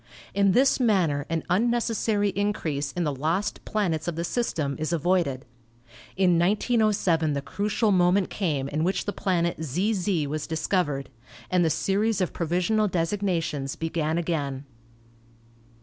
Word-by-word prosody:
In 200 -1 +3
this 265 +5 +4
manner 180 - +2
an 165 -1 -1
unneces 235 +5 +1
sary 205 -1 +1
increase 165 -9 -2
in 175 - -1
the 150 -3 0
lost 165 +9 -1
planets 175 -8 -1
of 175 - -2
the 170 - -2
system 165 - -1
is 155 +1 -2
avoided. 170 -5 0 0.7
In 180 -3 +4
1907 195 -5 +2
the 140 - -2
crucial 210 - 0
moment 185 +1 +3
came 150 -9 -1
in 150 +2 -1
which 185 +3 0
the 205 - -2
planet 170 -3 -1
ZZ 180 - 0
was 150 +1 -4
discovered, 160 -4 -1 0.4
and 180 -1 +3
the 165 - +3
series 200 +5 +1
of 185 - -1
provisional 180 +6 +1
designations 165 -6 -1
began 160 -1 -1
again. 145 -5 -2
175 Hz, 140 wpm, -26 LUFS, 155-200 Hz, 0.7 s, this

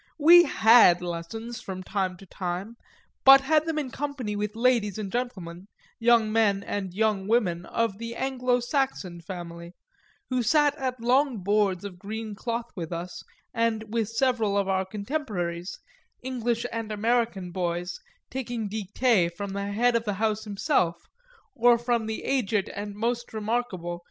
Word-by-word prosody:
We 345 +3 +8
had 220 - +6
lessons 220 +8 -5
from 185 -1 -6
time 185 -1 -2
to 195 - -14
time, 185 +4 -5 0.5
but 270 0 +9
had 310 +3 +2
them 320 -1 -1
in 280 -4 -2
company 270 -7 -4
with 210 +1 -3
ladies 230 -4 +2
and 205 -3 -5
gentlemen, 195 -8 -4 0.3
young 230 -2 +4
men 205 -3 +2
and 195 -3 -3
young 205 0 0
women 180 -7 +1
of 225 -3 -1
the 230 0 -5
Anglo 250 -2 0
Saxon 240 - -2
family, 170 -1 -8 0.6
who 255 -1 +1
sat 290 +4 +3
at 255 -2 -2
long 250 -2 +2
boards 200 -2 +1
of 185 -3 -8
green 215 +2 -5
cloth 235 +3 -4
with 170 -4 -5
us 170 +1 -5 0.3
and 220 -2 -1
with 225 -3 0
several 225 -4 +1
of 200 -1 +1
our 190 0 +1
contemporaries, 200 - -4 0.5
English 240 -2 -1
and 225 -1 -4
American 215 -4 0
boys, 175 0 -3 0.3
taking 240 -4 -3
dictées 205 -2 +1
from 200 +3 -6
the 200 0 -3
head 240 +4 +2
of 230 0 0
the 205 - -1
house 215 +1 -1
himself 195 -4 +1 0.6
or 240 0 +5
from 235 -1 -1
the 220 - -4
aged 220 -7 0
and 205 0 -6
most 235 +2 -2
remarkable 215 -5 -2
M. 175 - -7
220 Hz, 155 wpm, -26 LUFS, 190-240 Hz, 0.6 s, but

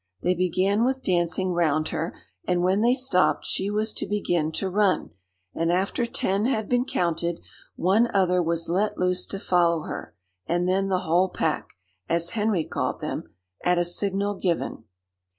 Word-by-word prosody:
They 180 - +3
began 185 +4 +1
with 265 +1 0
dancing 180 +1 +1
round 155 -3 +1
her, 165 +2 -3 0.3
and 180 -1 +1
when 190 +3 +2
they 240 +2 +4
stopped 250 -9 +2
she 195 - -1
was 215 +1 -1
to - - -3
begin 175 -6 0
to 195 - -1
run, 190 - +1 0.4
and 165 +1 0
after 195 +6 0
ten 210 -4 0
had 220 -5 0
been 245 0 +1
counted, 170 - -1 0.4
one 210 +7 +3
other 180 -2 +3
was 170 0 -1
let 195 +5 0
loose 180 0 0
to 195 - -4
follow 170 -4 +2
her, - - -7 0.3
and 175 +1 +1
then 195 +1 +1
the 185 -1 0
whole 180 +2 +2
pack, - - -2 0.4
as 170 0 +1
Henry 210 -6 +1
called - - -2
them, - - -5 0.3
at 180 0 +3
a 175 - +2
signal 200 +3 0
given. 175 - -2
185 Hz, 170 wpm, -25 LUFS, 175-205 Hz, 0.4 s, they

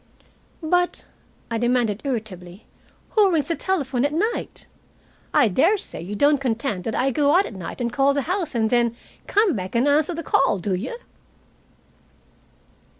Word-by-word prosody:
"But," 355 +2 0 0.5
I 230 - -1
demanded 240 -3 +1
irritably, 205 -8 -5 0.4
"who 415 -4 +3
rings 320 -2 0
the 335 - +1
telephone 280 -11 -1
at 285 - +1
night? 425 +10 -2 0.7
I 245 - +4
daresay 335 - +1
you 190 +5 -6
don't 285 +4 +3
contend 225 -6 -2
that 225 - -2
I 270 +2 +1
go 290 +4 +2
out 390 - +3
at - - -8
night 185 +2 -7
and 240 -1 -2
call 275 +1 +3
the 280 -1 -1
house, 350 -4 -2
and 220 -1 +1
then 235 -1 +2 0.3
come 415 - +2
back 185 0 -5
and 240 +4 +3
answer 305 +4 +2
the 335 - -5
call, 270 -7 +2
do 190 +2 -2
you?" 215 - -4
265 Hz, 160 wpm, -23 LUFS, 220-315 Hz, 0.7 s, I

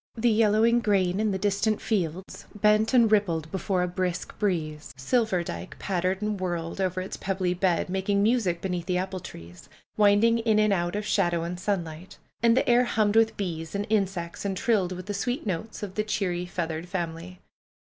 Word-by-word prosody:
The 235 0 +2
yellowing 220 +2 +4
grain 195 -4 +1
in 215 0 +1
the 195 - -1
distant 205 +2 0
fields 185 -3 -3
bent 215 +2 +3
and 235 -4 +5
rippled 170 -7 +1
before 190 -1 0
a - - 0
brisk 180 0 -3
breeze. 155 -9 -2
Silverdike 185 - -1
pattered 190 +1 -1
and 210 -2 -2
whirled 175 0 -3
over 185 -1 -1
its 185 - -6
pebbly 190 -2 -1
bed, 180 -2 +1
making 195 +2 0
music 210 -7 +1
beneath 180 -3 -3
the 180 - +1
apple 190 +1 -3
trees; 85 - -12 0.3
winding 210 +3 +4
in 225 -2 +2
and 215 -1 +3
out 175 0 -1
of 210 0 -3
shadow 175 -5 +1
and 175 +1 -4
sunlight. 175 -3 -4 0.2
And 235 +1 +4
the - - +2
air 245 +1 +5
hummed 215 -3 +1
with 225 0 +3
bees 165 -3 -4
and 200 +1 -1
insects 190 -5 -1
and 195 -2 -2
trilled 200 -6 +1
with 185 0 -6
the 205 - -4
sweet 245 +8 -2
notes 210 +3 -4
of 195 -2 -5
the 215 - -1
cheery 185 -5 -2
feathered 170 -1 -4
family. 175 0 -5
190 Hz, 185 wpm, -26 LUFS, 175-215 Hz, 0.3 s, and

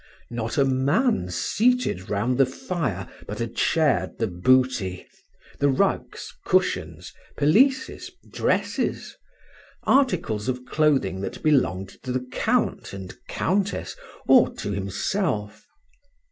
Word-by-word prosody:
Not 115 -1 -3
a 140 - +4
man 135 - +1
seated 220 - 0
round 115 +6 0
the 135 - +7
fire 130 - -3 0.2
but 105 - -5
had 115 0 -4
shared 160 -4 +1
the 115 - 0
booty, 105 -1 +1 0.5
the 145 - +3
rugs, 130 - -1
cushions, - - 0 0.2
pelisses, 260 - +2 0.2
dresses, - - -1 0.7
articles 130 - +1
of 125 0 -3
clothing 135 -13 +1
that - - -6
belonged 95 - +1
to 130 - -5
the 125 0 -2
Count - - 0
and 95 -1 -7
Countess 200 +1 -1 0.3
or - - +6
to 105 - -4
himself. 105 - -2
130 Hz, 110 wpm, -24 LUFS, 100-155 Hz, 0.7 s, the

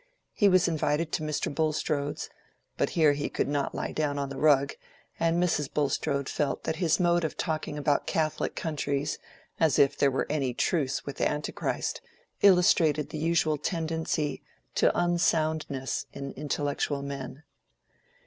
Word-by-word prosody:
He 205 - +4
was 185 -2 +4
invited 160 0 0
to - - -1
Mr. 150 -1 -2
Bulstrode's; 150 -1 -1 0.5
but - - 0
here 155 -3 +5
he 145 +1 -2
could - - -1
not 145 -1 -1
lie - - -3
down 145 -2 -1
on 140 -1 -2
the 135 - -6
rug, 140 -2 +4 0.5
and 165 0 +2
Mrs. 160 -5 +1
Bulstrode 140 -1 0
felt 145 -2 -1
that 160 - -2
his 170 -1 +2
mode 175 -1 +3
of 160 - -3
talking 155 -2 -2
about 145 -1 +1
Catholic 155 -4 -1
countries, 145 -2 -2 0.4
as 160 -4 +3
if 140 +1 +4
there 140 - +3
were 135 - -1
any 135 -5 -1
truce 140 -5 0
with 140 - -6
Antichrist, 150 0 -1 0.4
illustrated 170 -6 +4
the 155 - -4
usual 160 -2 +1
tendency 160 -2 -2 0.3
to - - +4
unsoundness 160 -5 0
in 140 0 -6
intellectual 145 -1 -2
men. 140 +1 -6
150 Hz, 150 wpm, -28 LUFS, 140-160 Hz, 0.5 s, here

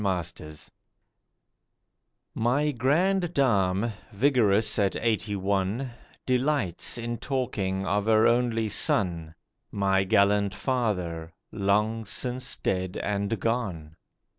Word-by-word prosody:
FATHER 90 -5 -2
AND 75 0 -10
SON - - -11 1.6
MY 135 +6 +1
grand 170 +8 +1
dame, 105 -5 +2 0.2
vigorous 110 -3 +2
at 100 -2 +1
eighty 110 -2 -1
one, 100 +6 -1 0.3
Delights 125 - +1
in 120 0 -4
talking 100 -8 -2
of 105 +1 0
her 110 0 +5
only 115 -2 +2
son, 85 -6 0 0.4
My 95 -1 +1
gallant 100 +1 +2
father, 90 -11 -2 0.2
long 105 +2 0
since 125 +4 -3
dead 95 -1 -2
and 100 +1 -2
gone. 95 -10 -2
105 Hz, 105 wpm, -27 LUFS, 95-125 Hz, 1.6 s, her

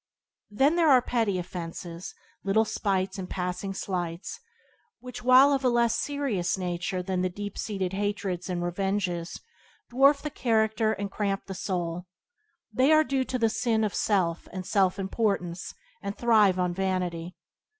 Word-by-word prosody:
Then 275 +10 +2
there 330 -2 +4
are 260 -2 +7
petty 230 -5 0
offences, 175 0 -6 0.3
little 215 +3 +3
spites 195 -2 -1
and 180 - -6
passing 180 +1 -3
slights, 175 - -4 0.6
which, 250 0 -8
while 255 +3 +7
of 270 -1 0
a 255 - +4
less 235 -1 +2
serious 240 -14 -1
nature 180 +1 -2
than 185 -1 -1
deep 200 +2 -3
seated 195 -3 -3
hatreds 200 -2 -2
and 175 -1 -2
revenges, 180 -1 -2 0.5
dwarf 275 +3 +5
the 300 - -3
character 220 -3 +1
and 200 -1 -4
cramp 200 -1 -2
the 195 - -6
soul. 180 -2 -3 0.7
They 265 +4 +4
are 310 0 +6
due 270 -3 0
to 255 - -2
the 230 -2 +3
sin 220 0 0
of 210 - -1
self 180 -5 0
and 185 0 -6
self 190 -2 +2
importance 195 -3 -2 0.3
and 200 - -5
thrive 215 -6 +4
on 180 -1 0
vanity. 180 -2 -2
195 Hz, 150 wpm, -27 LUFS, 180-230 Hz, 0.7 s, are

